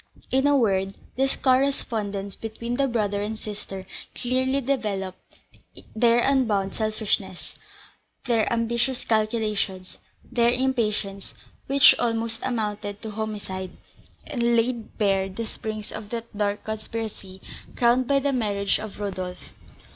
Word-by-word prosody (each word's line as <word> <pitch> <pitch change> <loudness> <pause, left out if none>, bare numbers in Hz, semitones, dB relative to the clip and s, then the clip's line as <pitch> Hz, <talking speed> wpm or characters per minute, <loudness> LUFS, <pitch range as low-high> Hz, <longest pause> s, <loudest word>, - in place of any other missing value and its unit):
In 265 +2 +4
a 290 -1 +5
word, 195 -5 +2 0.2
this 270 +1 +2
correspondence 225 -7 +1
between 230 +2 -5
the 275 +2 +2
brother 205 -4 0
and 215 +2 -3
sister 200 -3 -7 0.3
clearly 260 +2 +1
developed 210 -9 -3 0.6
their 235 +1 +5
unbounded 225 -8 +2
selfishness, 215 -4 -2 0.7
their 230 -3 +2
ambitious 235 +2 0
calculations, 215 -4 0 0.2
their 235 0 +2
impatience, 220 -6 -1 0.3
which 275 0 +8
almost 230 -1 0
amounted 210 -4 -2
to 220 - -4
homicide, 205 -4 -4 0.5
and 250 - -3
laid 230 0 0
bare 195 -2 +2
the 225 +5 -4
springs 215 -1 -5
of 210 -1 -7
that 230 -1 -6
dark 205 0 0
conspiracy 215 -3 -5 0.4
crowned 245 +1 +3
by 280 - +4
the 275 0 +1
marriage 205 -5 +1
of 215 -1 -7
Rodolph. 185 -3 -5
220 Hz, 120 wpm, -25 LUFS, 205-240 Hz, 0.7 s, which